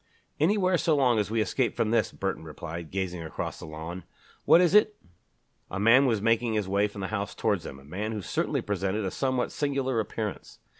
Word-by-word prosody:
"Anywhere 185 +2 +3
so 160 - +2
long 125 -5 +3
as 105 - -1
we 110 0 +1
escape 115 +5 0
from 110 - 0
this," 115 - +2
Burton 95 -4 -3
replied, 80 +1 -7
gazing 90 -3 -3
across 80 - -5
the - - -9
lawn. 80 +4 -7 0.4
"What - - +7
is 175 0 +3
it?" 210 0 +5 0.7
A 100 - -4
man 120 +6 +6
was 110 -4 0
making 115 0 +2
his 105 -3 0
way 100 +2 +2
from 100 -1 -9
the 95 - -3
house 100 -1 -3
towards 100 -6 0
them, 70 - -7
a 70 - -15
man 100 +9 -4
who 105 -3 -4
certainly - - -1
presented 100 +2 -1
a 95 - -2
somewhat 130 -2 -1
singular 135 -4 -1
appearance. 110 -1 -4
110 Hz, 205 wpm, -27 LUFS, 95-130 Hz, 0.7 s, What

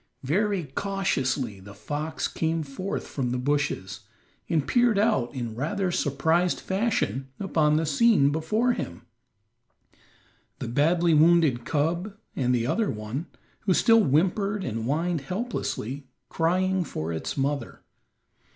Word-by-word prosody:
Very 195 +6 +1
cautiously 135 - -1
the 100 +1 -12
fox 150 +9 -3
came 160 0 -1
forth 155 +8 -4
from 130 -3 -3
the 125 - -1
bushes, 140 -7 -1 0.5
and 155 -4 +1
peered 240 -4 +3
out 200 - +2
in 120 -3 -4
rather 180 - -1
surprised 165 +4 +1
fashion 190 - -1
upon 155 -6 +2
the 160 +1 +1
scene 155 -2 +4
before 210 +11 +1
him; 85 - -6 1.5
the - - -5
badly 165 +7 +2
wounded 155 -6 +4
cub, 170 +7 -1 0.2
and 125 -2 +1
the 115 -1 0
other 220 - +1
one, 110 +9 -4 0.3
who 190 -4 +1
still 225 -1 +5
whimpered 195 +7 +1
and 115 -7 -3
whined 165 +4 0
helplessly, 145 - -4 0.2
crying 185 +3 +1
for 80 - -4
its 80 - -4
mother. 140 +1 -2
155 Hz, 125 wpm, -26 LUFS, 130-190 Hz, 1.5 s, still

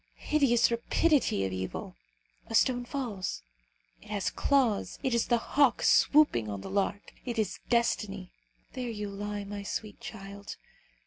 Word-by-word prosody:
Hideous 260 -7 +3
rapidity 240 - +2
of 95 - -3
evil! 95 0 -5 0.5
A 225 - -3
stone 245 +1 +3
falls. 230 - -4 0.6
It 210 - -16
has 205 -2 -1
claws. 260 -8 +1
It 260 - +1
is 235 - +1
the 240 - +3
hawk 270 +2 +2
swooping 280 - +4
on 100 -1 -4
the - - -7
lark. 200 +1 -1
It 240 -2 -4
is 215 -2 -1
destiny. 205 -5 0 0.4
There 250 -2 -4
you 210 -2 -4
lie, 205 +1 -4
my 200 0 -6
sweet 205 +1 -5
child! 200 -1 -8
215 Hz, 145 wpm, -29 LUFS, 200-245 Hz, 0.6 s, swooping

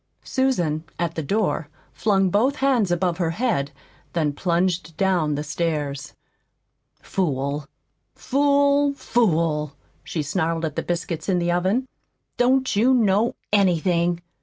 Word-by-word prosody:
Susan, 175 - 0
at 170 -1 -1
the 160 - -3
door, 185 -2 -1 0.2
flung 195 -3 +2
both 250 +9 +2
hands 260 -8 +2
above 175 0 0
her 170 -2 +1
head, 165 - -1 0.4
then 155 -4 0
plunged 175 0 -1
down 175 -6 +1
the 145 - -3
stairs. 150 -3 -3 0.9
"Fool! 140 -5 -2 0.5
FOOL! 285 +1 +2
FOOL!" 160 - +1 0.3
she 155 - -3
snarled 165 +2 -1
at 155 -2 -4
the - - -1
biscuits 170 -1 -3
in 185 - +2
the 175 0 0
oven. 190 +9 +1 0.5
"Don't 260 0 +2
you 245 +6 +4
know 215 -1 +2 0.2
ANYTHING?" 175 -3 +2
175 Hz, 125 wpm, -23 LUFS, 160-220 Hz, 0.9 s, you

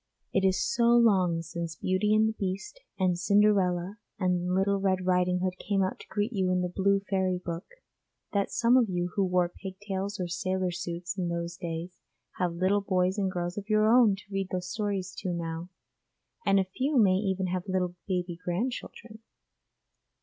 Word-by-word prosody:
It 195 - +2
is 190 -1 +3
so 235 -1 +3
long 185 -8 +3
since 170 -1 -5
Beauty 200 +3 +1
and 215 0 +4
the 220 - -1
Beast 195 - -4 0.2
and 180 -2 +1
Cinderella 195 -1 +2 0.2
and 180 -2 0
Little 200 +1 +2
Red 190 -1 0
Riding 180 0 +2
Hood 185 -1 -2
came 195 -2 0
out 185 - -2
to - - -12
greet 210 +3 -2
you 190 -3 +1
in 180 0 +2
the 180 - -1
'Blue 200 0 +3
Fairy 190 -2 +1
Book,' 180 - -7 0.5
that 200 -1 +1
some 240 +1 +4
of 235 -5 +3
you 175 -1 -1
who 200 - +1
wore 180 -1 +2
pigtails 195 +2 -5
or 180 - -1
sailor 185 +1 -1
suits 175 +2 -4
in 175 -2 -1
those 170 0 -3
days 170 0 -6 0.4
have 175 -2 0
little 190 +4 +2
boys 185 0 +1
and 190 -2 0
girls 175 +2 -3
of 205 +2 -12
your 215 0 +4
own 230 -3 +6
to 195 - -13
read 195 -1 -1
the 185 - -1
stories 190 -1 -3
to 185 -3 -2
now, 165 0 -4 0.8
and 195 0 +5
a - - +3
few 260 +10 -1
may 190 -5 +5
even 190 -1 -1
have 180 +1 -3
little 180 -1 0
baby 180 -2 -2
grandchildren. 220 +3 -4
185 Hz, 185 wpm, -28 LUFS, 180-200 Hz, 0.8 s, own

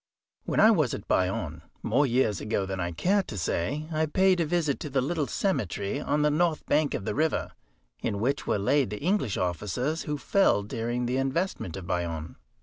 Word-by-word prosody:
When - - 0
I 220 - +8
was 155 - +2
at 100 - -9
Bayonne, 85 -4 0 0.2
more 145 0 +3
years 120 -5 +1
ago 105 -2 -1
than 95 0 -4
I 85 -1 -1
care 190 - +2
to 115 - -8
say, 140 - -1
I 155 0 +1
paid 185 +3 +3
a 165 - +1
visit 155 -4 0
to 150 - -5
the 135 0 +1
little 145 +2 -1
cemetery 105 - -1
on 150 +1 +1
the 150 - +3
north 160 +1 +1
bank 150 0 +2
of 95 - -4
the - - -1
river, 155 +2 0 0.5
in 100 - -2
which 130 +6 -1
were - - +2
laid 130 +5 +2
the 105 - -5
English 180 - +1
officers 105 - -1
who 150 0 -3
fell 145 - +3
during 120 +3 -2
the 125 +2 0
investment 135 - -1
of 95 - -7
Bayonne. 85 -3 -3
130 Hz, 200 wpm, -27 LUFS, 100-155 Hz, 0.5 s, I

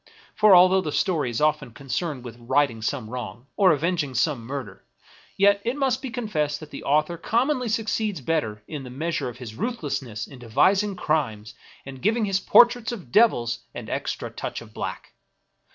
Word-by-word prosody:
For, 210 -3 +6
although 185 +1 +6
the 155 - -3
story 155 -5 0
is 115 - -3
often 150 -6 +1
concerned 135 +1 -4
with 120 -1 -9
righting 130 -1 +1
some 115 0 -2
wrong, 120 -1 -7
or 195 -3 +5
avenging 155 -3 0
some 120 -2 0
murder, 130 -8 -6 0.5
yet 200 +1 +4
it 240 +3 -1
must 270 -4 +1
be 265 - -5
confessed 160 - -2
that 155 -1 -11
the 140 - -8
author 155 +4 +1
commonly 250 - 0
succeeds 215 -3 -1
better 120 -8 -2
in 150 -4 -6
the 125 - -8
measure 155 +1 -2
of 120 - -10
his 120 -4 -8
ruthlessness 140 - -3
in 135 - -13
devising 195 - +2
crimes 115 - -1 0.3
and 135 -1 -9
giving 220 +2 +2
his 195 -2 +1
portraits 240 +3 +5
of 185 - -8
devils 120 - +3 0.2
an - - -7
extra - - -3
touch - - -5
of - - -14
black. - - -6
150 Hz, 175 wpm, -24 LUFS, 125-200 Hz, 0.5 s, For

